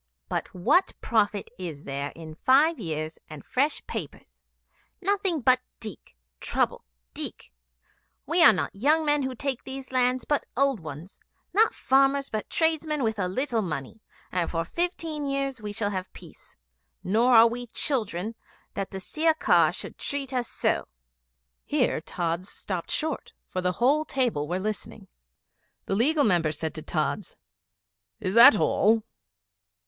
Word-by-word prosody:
But - - -3
what 285 - +3
profit 210 -3 0
is 160 -5 -6
there 140 +1 -3
in 160 -1 -9
five 275 - +3
years 155 -4 -4
and 155 -2 -10
fresh 285 +4 0
papers? - - -7 0.6
Nothing 385 -4 0
but 255 +1 +4 0.2
dikh, 215 - -8 0.2
trouble, - - 0 0.3
dikh. - - -5 0.7
We 335 +2 +3
are 300 - +10
not 185 - -2
young 300 +9 +2
men 295 -1 +2
who 260 -1 -3
take 265 0 -3
these 265 0 -8
lands, 255 0 +2
but 290 - +1
old 275 -3 +3
ones 160 +3 -9 0.3
not 440 +4 +4
farmers, 275 +1 +2
but 215 -1 -3
tradesmen 315 -3 0
with 220 -2 -1
a 185 - +1
little 235 +4 0
money 155 - -5 0.3
and 180 -2 0
for 165 -1 -2
fifteen 325 - -2
years 275 -3 -2
we 210 -1 -5
shall 205 -1 -1
have 185 -1 -4
peace. - - -14 0.5
Nor 235 +6 +3
are 225 +1 +9
we 240 +1 -5
children 220 - 0 0.4
that 195 -1 -3
the 190 - -6
Sirkar 315 - +3
should - - -7
treat 275 -2 -2
us 245 -2 -1
so."' - - 0 0.8
Here - - 0
Tods 170 +2 -3
stopped 185 -4 -5
short, 310 -2 -3 0.2
for 185 - -2
the 180 0 0
whole 275 - +3
table 240 - 0
were 180 +3 -1
listening. 210 +1 -5 0.8
The - - -2
Legal 285 +9 +3
Member 175 - +3
said 160 +1 -4
to 155 - -6
Tods, 155 +5 -2 0.8
'Is 185 - -2
that 235 -1 +9
all?' 220 +2 +3
230 Hz, 150 wpm, -26 LUFS, 185-280 Hz, 0.8 s, are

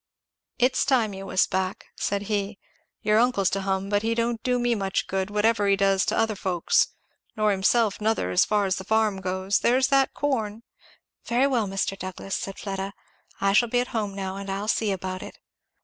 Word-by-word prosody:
"It's 255 +1 +2
time 240 -6 +2
you 195 0 -7
was 185 - +3
back," 185 0 -2
said 200 0 -2
he. 205 0 -2 0.5
"Your 215 +1 +3
uncle's 225 -6 +2
to 195 - -1
hum, 195 0 -1
but 205 0 +2
he 225 +1 0
don't 235 0 -1
do 250 -1 +1
me 240 -1 +1
much 195 -3 -1
good, 190 0 -2
whatever 210 0 +2
he 200 - +4
does 195 -1 +2
to - - 0
other 225 -1 +2
folks 185 -3 +1 0.5
nor 215 -1 +3
himself 205 +2 +2
nother, 215 - 0
as 90 - +4
far 210 -1 +1
as 190 -1 0
the 190 - -5
farm 215 -1 +1
goes; 190 +1 0
there's 260 +2 +3
that 275 -1 +3
corn" 230 -6 -2 0.6
"Very 245 +3 +2
well, 245 -6 +1
Mr. 195 0 -1
Douglass," 190 0 -5
said 195 - -5
Fleda, 195 0 -4 0.5
"I 195 0 +2
shall 235 +3 +4
be 245 - +2
at 250 - -1
home 210 -4 -3
now 190 -1 -4
and 200 0 -6
I'll 195 +2 -3
see 220 -1 +1
about 185 -1 -4
it." - - -10
205 Hz, 200 wpm, -25 LUFS, 195-230 Hz, 0.6 s, he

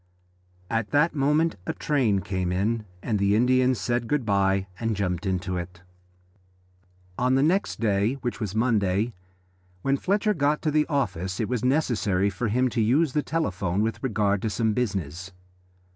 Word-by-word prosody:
At 115 0 -1
that 150 +4 +3
moment 150 +3 +1
a - - -1
train 120 -10 +1
came 95 -2 -2
in, 105 +4 0 0.2
and 105 -3 0
the 100 +1 +3
Indian 130 +2 +3
said 120 +2 -1
good 145 -3 0
bye 100 -2 +2
and 115 -1 -1
jumped 95 -1 -2
into 95 -1 -1
it. 90 0 -7 1.4
On 125 +1 +2
the 135 - +3
next 185 +6 +1
day, 105 +1 +1
which 120 - -3
was 105 -3 -4
Monday, 110 -1 +1 0.7
when 135 0 +2
Fletcher 205 +6 +1
got 150 -2 +1
to 155 - +1
the 150 0 +2
office 100 - -2
it 110 - 0
was 125 -2 -2
necessary 105 -8 +1
for 120 - -2
him 125 +4 +2
to 120 -1 -1
use 130 +6 +2
the 150 - +2
telephone 100 - -1
with 115 +1 -2
regard 105 -5 0
to 110 - -1
some 110 +1 0
business. 95 - -3
115 Hz, 165 wpm, -25 LUFS, 100-130 Hz, 1.4 s, that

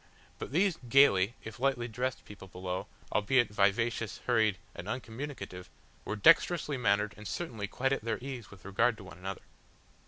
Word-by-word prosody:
But - - -6
these 180 +2 +2
gaily, 115 -6 +5
if 110 +2 -8
lightly 130 -3 +1
dressed 125 +2 -3
people 100 -2 -11
below, 90 0 -4 0.2
albeit 120 +3 +3
vivacious, 105 +2 +1
hurried 110 -5 +3 0.2
and 90 - -8
uncommunicative, 110 -6 -6 0.4
were 105 - -2
dexterously 165 - +4
mannered 105 -4 +1
and 105 0 -8
certainly 115 -12 -4
quite 135 +6 0
at 135 - -1
their 115 -1 -1
ease 125 -4 -7
with 100 -3 -15
regard 115 +4 +2
to 105 - -11
one 95 -1 -12
another. 95 +1 -5
110 Hz, 160 wpm, -31 LUFS, 100-130 Hz, 0.4 s, gaily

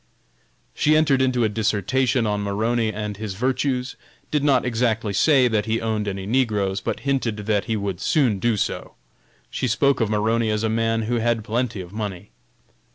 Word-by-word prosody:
She 155 +1 +3
entered 140 -4 +3
into 130 -2 +2
a - - +4
dissertation 115 +4 +1
on 105 -1 -1
Maroney 110 +3 0
and 105 -1 -5
his 105 -3 -5
virtues; 130 +2 -1 0.4
did 150 -2 +1
not 135 -4 +3
exactly 115 -3 0
say 130 - +4
that 110 -3 0
he 110 +1 0
owned 110 -2 -2
any 95 -1 -4
negroes, 105 -5 0
but - - -3
hinted 130 -6 -1
that 105 -2 +1
he 115 - -1
would 100 -2 -4
soon 125 -10 +2
do 115 +1 +1
so. - - -3 0.6
She 130 - -2
spoke 135 +3 +2
of 110 - +1
Maroney 110 +2 +1
as 105 0 -1
a 110 - +1
man 115 0 0
who 120 +2 -1
had 115 -1 0
plenty 115 -2 -2
of 90 +1 -11
money. 105 -3 -5
115 Hz, 180 wpm, -23 LUFS, 105-125 Hz, 0.6 s, a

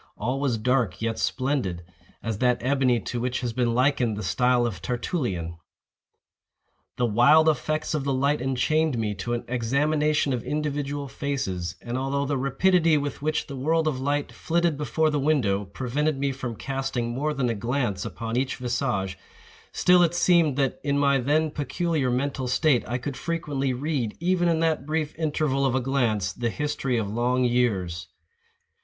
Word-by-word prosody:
All 125 +5 -2
was 135 -5 0
dark 120 -3 0
yet 115 0 -2
splendid—as 105 - -3
that 125 -1 +3
ebony 130 -1 +2
to 120 - -4
which 125 +1 -2
has 120 -2 -2
been 120 -1 0
likened 125 -4 +2
the 105 - -4
style 125 +6 +2
of 100 -9 -4
Tertullian. 110 - -2 1.4
The 125 - +2
wild 140 +8 +5
effects 155 +1 0
of 150 -3 -1
the 140 - -1
light 140 +2 +1
enchained 135 +3 +1
me 105 -2 -1
to 105 +4 -4
an 120 - -5
examination 145 +4 +1
of 125 - -2
individual 145 -1 -2
faces; 130 -12 -3
and 120 +2 -3
although 140 +1 -1
the 140 -1 -1
rapidity 160 +4 +3
with 145 -2 -3
which 155 +1 0
the 140 - -7
world 160 +4 +1
of 140 -4 -1
light 145 +2 -1
flitted 170 -1 0
before 155 +2 0
the 150 - 0
window, 120 -9 +1
prevented 130 +9 -1
me 140 0 0
from 130 -3 -5
casting 135 -2 -3
more 145 +5 -1
than 135 -4 -1
a 115 - +1
glance 115 -3 -1
upon 115 +1 -4
each 130 +1 0
visage, 120 -7 -2 0.5
still 180 0 +4
it 170 0 +2
seemed 170 -5 +3
that, 135 -2 0
in 140 -1 +1
my 140 -1 +3
then 150 +4 +1
peculiar 150 0 -1
mental 130 +1 -1
state, 125 0 +2
I 120 - -1
could 130 +2 -5
frequently 150 -5 -2
read, 130 -3 -2
even 175 +1 +1
in 165 -1 +1
that 155 -4 0
brief 155 -1 -1
interval 150 -3 0
of 130 -2 +2
a - - +3
glance, 120 -8 0
the 120 +3 -2
history 140 -1 -1
of 110 -3 -1
long 120 +4 +1
years. 95 -9 0
135 Hz, 170 wpm, -25 LUFS, 120-150 Hz, 1.4 s, wild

